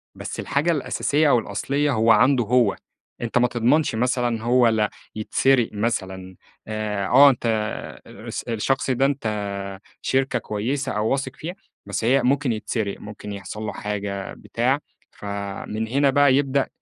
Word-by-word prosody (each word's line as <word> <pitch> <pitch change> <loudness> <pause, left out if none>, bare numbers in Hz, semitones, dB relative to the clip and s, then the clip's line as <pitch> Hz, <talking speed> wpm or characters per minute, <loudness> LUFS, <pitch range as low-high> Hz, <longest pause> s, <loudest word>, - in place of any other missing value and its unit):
بس - - -6
الحاجة 150 +5 +1
الأساسية 150 0 +1
أو 125 - +5
الأصليّة 140 +8 -1
هو 115 -2 +3
عنده 125 +1 +5
هو، 120 -1 +3 0.5
أنت 120 +1 -1
ما 125 0 +4
تضمنش 125 +3 +2
مثلًا 120 -1 0
هو 120 +1 +4
لا 110 -2 +2 0.3
يتسرق 120 +3 +2
مثلًا، 95 -4 -3 0.3
آآ، 105 -2 -2
آه 140 +5 +8
أنت 120 -3 -2
آآ 110 -1 -2
الس - - -7
الشخص 120 +4 -1
ده 130 +2 +2
أنت 140 -3 -1 0.8
شركة 135 -2 +1
كويّسة 130 +7 -2
أو 105 -1 0
واثق 135 -1 -1
فيها 175 +3 -6 0.3
بس 100 +2 -3
هي 130 +4 +4
ممكن 140 0 +2
يتسرق، 110 -2 -2
ممكن 105 0 -8
يحصل 100 +1 -7
له 110 - -3
حاجة 100 -1 -4
بتاع، 130 +4 -1 0.3
فمن 100 +2 -5
هنا 140 +3 +2
بقى 140 -1 +5
يبدأ 140 -1 +1
120 Hz, 150 wpm, -23 LUFS, 105-135 Hz, 0.8 s, آه